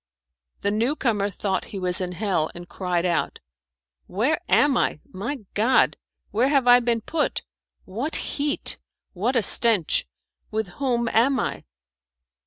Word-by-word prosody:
The 200 Hz, -, 0 dB
new 230 Hz, +8 st, 0 dB
comer 210 Hz, -8 st, 0 dB
thought 190 Hz, -1 st, -3 dB
he 205 Hz, -, -8 dB
was 180 Hz, -1 st, +1 dB
in 180 Hz, -1 st, -3 dB
hell, 180 Hz, -4 st, -1 dB
and 175 Hz, 0 st, -9 dB
cried 180 Hz, -2 st, -2 dB
out, 175 Hz, -2 st, -1 dB, 0.7 s
"Where 250 Hz, -, 0 dB
am 290 Hz, -3 st, +4 dB
I? 155 Hz, -, 0 dB
My 220 Hz, +5 st, -5 dB
God! 230 Hz, +5 st, +3 dB, 0.4 s
where 240 Hz, +6 st, +2 dB
have 275 Hz, -4 st, +2 dB
I 245 Hz, 0 st, +8 dB
been 235 Hz, -2 st, 0 dB
put? 305 Hz, +7 st, -2 dB, 0.4 s
What 240 Hz, -, -4 dB
heat! 290 Hz, 0 st, -1 dB, 0.4 s
What 225 Hz, +8 st, -1 dB
a 235 Hz, -, +3 dB
stench! 215 Hz, -6 st, +4 dB, 0.4 s
With 220 Hz, -3 st, -3 dB
whom 240 Hz, -3 st, 0 dB
am 255 Hz, +4 st, +2 dB
I?" -, -, -4 dB
220 Hz, 145 wpm, -23 LUFS, 190-255 Hz, 0.7 s, I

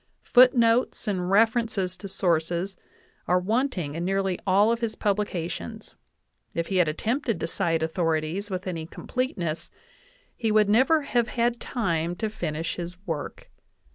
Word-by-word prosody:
Foot 255 Hz, +1 st, +6 dB
notes 235 Hz, 0 st, +2 dB
and 185 Hz, -3 st, -1 dB
references 215 Hz, -3 st, +2 dB
to 200 Hz, -, -7 dB
sources 175 Hz, 0 st, 0 dB, 0.5 s
are 180 Hz, -, +4 dB
wanting 200 Hz, -, -1 dB
in 165 Hz, +2 st, -3 dB
nearly 195 Hz, 0 st, 0 dB
all 200 Hz, +4 st, +5 dB
of 235 Hz, -, 0 dB
his 230 Hz, -2 st, -2 dB
publications; 190 Hz, -, -3 dB, 0.6 s
if 170 Hz, 0 st, -2 dB
he 190 Hz, -, 0 dB
had 175 Hz, -3 st, +4 dB
attempted 230 Hz, -, -1 dB
to -, -, -1 dB
cite 165 Hz, -1 st, 0 dB
authorities 165 Hz, +3 st, -1 dB
with 185 Hz, -1 st, -4 dB
any 165 Hz, -4 st, -4 dB
completeness, 175 Hz, -9 st, -3 dB, 0.7 s
he 225 Hz, -3 st, -1 dB
would 210 Hz, -1 st, +4 dB
never 270 Hz, +8 st, +4 dB
have 240 Hz, -4 st, +1 dB
had 240 Hz, 0 st, 0 dB
time 170 Hz, -7 st, -1 dB
to 220 Hz, +2 st, -3 dB
finish 165 Hz, -5 st, -3 dB
his 175 Hz, +1 st, -6 dB
work. 160 Hz, -5 st, -5 dB
195 Hz, 145 wpm, -26 LUFS, 170-230 Hz, 0.7 s, Foot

